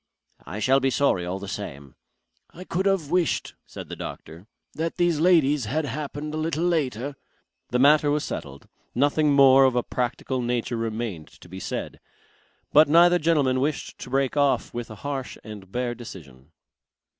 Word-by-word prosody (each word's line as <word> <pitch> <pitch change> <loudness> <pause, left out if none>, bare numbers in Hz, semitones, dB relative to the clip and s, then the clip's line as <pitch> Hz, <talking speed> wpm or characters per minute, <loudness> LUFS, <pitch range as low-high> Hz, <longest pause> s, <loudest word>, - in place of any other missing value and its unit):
"I 95 - -6
shall 130 +5 +3
be 135 0 +1
sorry 120 -10 +1
all 90 +2 -3
the 100 +1 -8
same." 70 -10 -7 0.6
"I 180 - -11
could 185 +2 -1
have 180 -7 0
wished," 180 -2 0
said - - -9
the - - -7
doctor, 85 +6 -9 0.3
"that 165 +1 -3
these 175 -3 +1
ladies 150 -6 +3
had 150 +8 -1
happened 150 +1 -5
a - - -3
little 160 +1 -1
later...." 145 -6 -1 0.5
The 125 - 0
matter 145 +3 +5
was 150 +1 +1
settled. 70 -1 -7 0.3
Nothing 145 +3 +2
more 135 -1 +7
of 130 -2 +3
a 125 - +1
practical 125 +1 -2
nature 120 0 -1
remained 115 -7 -4
to - - -15
be 95 +2 -9
said. - - -5 0.7
But 150 0 +7
neither 175 +2 +6
gentleman 145 -6 +2
wished 145 +2 -3
to - - -8
break 135 +1 0
off 140 -2 +1
with 120 -1 -5
a 110 - -8
harsh 135 -3 -4
and 105 -4 -10
bare 120 +1 -2
decision. 75 - -12
135 Hz, 170 wpm, -25 LUFS, 115-150 Hz, 0.7 s, more